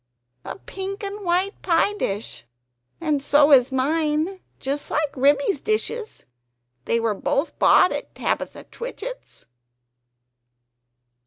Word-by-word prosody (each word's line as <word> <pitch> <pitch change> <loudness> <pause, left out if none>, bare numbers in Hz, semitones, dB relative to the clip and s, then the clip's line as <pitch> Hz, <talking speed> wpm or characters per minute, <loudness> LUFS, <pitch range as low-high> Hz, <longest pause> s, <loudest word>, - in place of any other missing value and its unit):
A - - -6
pink 390 +1 -6
and 405 +1 -5
white 370 +3 0
pie 355 +3 +2
dish! 205 - -4 0.6
and 305 -4 0
so 290 +1 +4
is 260 -1 +6
mine; 305 +6 0 0.2
just 280 +2 -3
like 300 -2 -1
Ribby's 285 +4 +2
dishes; 435 +1 -2 0.6
they 230 - +1
were 225 -2 0
both 275 - -2
bought 365 - +6
at - - -5
Tabitha - - -3
Twitchit's." - - -8
315 Hz, 110 wpm, -23 LUFS, 280-395 Hz, 0.6 s, is